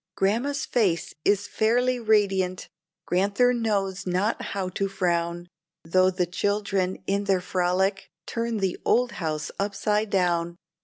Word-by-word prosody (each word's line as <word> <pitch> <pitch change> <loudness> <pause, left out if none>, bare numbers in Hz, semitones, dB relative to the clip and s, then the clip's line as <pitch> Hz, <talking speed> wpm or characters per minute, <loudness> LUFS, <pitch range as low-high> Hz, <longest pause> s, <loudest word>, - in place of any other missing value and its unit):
Grandma's 235 +9 0
face 190 -9 0
is 205 0 +2
fairly 245 +3 +1
radiant; 195 -5 +1 0.4
Grand'ther 200 +7 +2
knows 195 -5 -1
not 185 +5 0
how 195 -2 -3
to 195 +2 -1
frown, 175 -2 -1 0.4
though 185 +3 +4
the 180 -1 0
children, 195 0 -1
in 200 +1 0
their 195 -2 +2
frolic, 185 +2 0 0.2
turn 230 -1 -2
the 190 -3 -1
old 245 0 +2
house 155 -2 -2
upside 210 +2 0
down. 175 -3 +1
195 Hz, 125 wpm, -25 LUFS, 180-210 Hz, 0.4 s, though